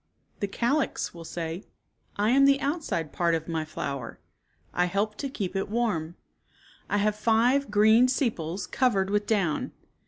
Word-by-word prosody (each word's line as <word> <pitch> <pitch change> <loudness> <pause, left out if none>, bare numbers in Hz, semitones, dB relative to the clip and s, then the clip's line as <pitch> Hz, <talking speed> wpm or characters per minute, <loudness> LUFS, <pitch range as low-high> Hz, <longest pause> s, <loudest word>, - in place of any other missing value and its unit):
The 200 - -1
calyx 245 +9 -1
will 170 -1 -9
say, 165 +3 -5 0.3
" - - -42
I 210 +3 +2
am 275 +2 +6
the 275 0 +5
outside 280 - -2
part 170 -1 +2
of 160 -1 -4
my 165 -2 -1
flower. 140 -5 -5 0.5
I 180 - +2
help 200 +4 -1
to 280 - -3
keep 200 -8 -4
it 195 - -1
warm. 200 -8 -1 0.7
I 205 - +1
have 210 +1 +1
five 230 +5 +2
green 220 +4 +5
sepals 205 - -1
cov 255 -2 +1
ered 190 0 +1
with 205 0 0
down. 195 -8 0
205 Hz, 165 wpm, -27 LUFS, 170-240 Hz, 0.7 s, am